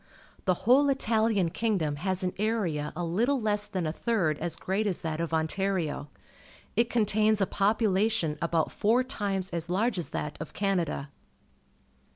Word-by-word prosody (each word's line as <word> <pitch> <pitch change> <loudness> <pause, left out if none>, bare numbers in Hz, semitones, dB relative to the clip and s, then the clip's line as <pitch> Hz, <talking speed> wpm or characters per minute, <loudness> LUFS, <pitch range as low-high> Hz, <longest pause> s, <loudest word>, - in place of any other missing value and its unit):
The 185 -2 +3
whole 275 +5 +5
Italian 220 -8 +1
kingdom 180 -11 0
has 185 +4 -1
an 180 - -1
area 195 -9 0
a 175 - -3
little 235 +11 +1
less 210 -2 +1
than 185 -4 -2
a 155 - 0
third 165 -6 0
as 165 0 -3
great 195 +5 -1
as 185 - -1
that 160 0 -2
of 170 - -2
Ontario. 160 -2 -1 0.7
It 235 0 +2
contains 215 -2 +2
a 195 - +3
population 205 -4 +1
about 165 -1 +1
four 230 +5 +2
times 200 -7 -3
as 170 0 -3
large 200 +2 +1
as 170 - -3
that 150 0 -4
of 160 - -7
Canada. 175 -8 -1
195 Hz, 160 wpm, -28 LUFS, 165-220 Hz, 0.7 s, whole